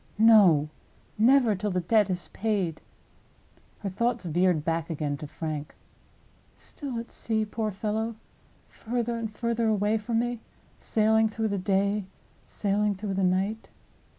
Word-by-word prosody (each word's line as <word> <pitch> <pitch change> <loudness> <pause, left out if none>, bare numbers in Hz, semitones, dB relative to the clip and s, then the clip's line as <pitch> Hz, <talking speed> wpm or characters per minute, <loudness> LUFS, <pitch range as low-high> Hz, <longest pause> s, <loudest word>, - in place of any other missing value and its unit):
"No: 200 -9 +6 0.5
never 245 0 +5
till 205 +2 -2
the 185 -2 0
debt 210 +3 +3
is 180 -1 -3
paid!" 195 -7 -1 1.0
Her 200 - -2
thoughts 235 +1 -1
veered 175 -1 +1
back 165 -1 -1
again 150 -3 -2
to 150 - -7
Frank. 150 -1 -5 0.8
"Still 275 -5 -6
at 230 0 -6
sea, 220 -1 -1
poor 215 +1 -2
fellow; 215 +3 -2 0.5
further 235 0 -3
and 230 -1 -3
further 235 +1 -1
away 215 0 +2
from 225 +2 -2
me; 240 0 -1 0.4
sailing 220 0 +3
through 220 0 -2
the 200 -1 -1
day, 200 +1 +1 0.4
sailing 205 0 0
through 195 +1 -4
the 190 0 0
night. 190 +4 0
210 Hz, 140 wpm, -27 LUFS, 185-225 Hz, 1.0 s, No